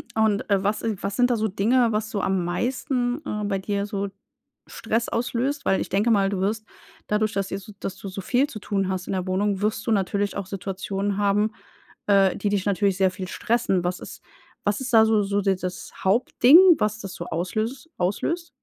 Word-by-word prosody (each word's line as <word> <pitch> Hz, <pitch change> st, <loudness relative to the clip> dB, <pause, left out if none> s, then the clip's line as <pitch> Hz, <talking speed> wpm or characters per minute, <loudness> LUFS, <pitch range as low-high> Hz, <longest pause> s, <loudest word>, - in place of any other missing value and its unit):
Und, 220 Hz, -1 st, +1 dB
äh, 195 Hz, -1 st, +2 dB
was 205 Hz, +2 st, 0 dB
i 225 Hz, -2 st, -1 dB
was 195 Hz, 0 st, -3 dB
sind 245 Hz, 0 st, +3 dB
da 245 Hz, -, +2 dB
so 220 Hz, -1 st, 0 dB
Dinge, 230 Hz, +5 st, +2 dB
was 215 Hz, 0 st, -1 dB
so 200 Hz, -3 st, -2 dB
am 190 Hz, -2 st, 0 dB
meisten, 245 Hz, -, -1 dB
äh, 210 Hz, 0 st, -3 dB
bei 195 Hz, -1 st, -1 dB
dir 200 Hz, +1 st, -2 dB
so 200 Hz, -1 st, -3 dB, 0.6 s
Stress 225 Hz, +1 st, -2 dB
auslöst? 250 Hz, +4 st, -1 dB
Weil 190 Hz, -, +2 dB
ich -, -, -4 dB
denke 210 Hz, +4 st, +2 dB
mal, 195 Hz, -2 st, +3 dB
du 195 Hz, -2 st, -2 dB
wirst 215 Hz, +3 st, -1 dB, 0.4 s
dadurch, 215 Hz, +1 st, 0 dB
dass 195 Hz, -1 st, -2 dB
ihr 195 Hz, -, -3 dB
so 205 Hz, +2 st, -12 dB
dass 190 Hz, -, -5 dB
du 195 Hz, -, -8 dB
so 190 Hz, +1 st, -6 dB
viel 255 Hz, +8 st, +1 dB
zu 220 Hz, -7 st, -8 dB
tun 195 Hz, -2 st, -1 dB
hast 185 Hz, -1 st, -3 dB
in -, -, -2 dB
der 185 Hz, -1 st, -2 dB
Wohnung, 195 Hz, +1 st, 0 dB
wirst 215 Hz, +1 st, -1 dB
du -, -, +2 dB
natürlich 200 Hz, 0 st, 0 dB
auch 200 Hz, -, -3 dB
Situationen 195 Hz, +1 st, -3 dB
haben, 205 Hz, +1 st, +2 dB, 0.6 s
äh, 195 Hz, -2 st, +4 dB
die 205 Hz, -, -1 dB
dich 200 Hz, -2 st, 0 dB
natürlich 200 Hz, -1 st, +1 dB
sehr 190 Hz, -1 st, +3 dB
viel 185 Hz, 0 st, -7 dB
stressen. 195 Hz, -5 st, 0 dB
Was 180 Hz, 0 st, -2 dB
ist -, -, -10 dB, 0.4 s
was 205 Hz, +4 st, 0 dB
ist 260 Hz, 0 st, -4 dB
da 220 Hz, -1 st, +7 dB
so 220 Hz, -1 st, +3 dB
so 200 Hz, 0 st, 0 dB
dieses 185 Hz, -2 st, -2 dB
Hauptding, 245 Hz, -, +5 dB, 0.2 s
was 215 Hz, +1 st, -1 dB
das 195 Hz, -3 st, -7 dB
so 175 Hz, -, -6 dB
auslös 215 Hz, -, -3 dB
auslöst? 330 Hz, -, -1 dB
205 Hz, 215 wpm, -24 LUFS, 195-220 Hz, 0.6 s, da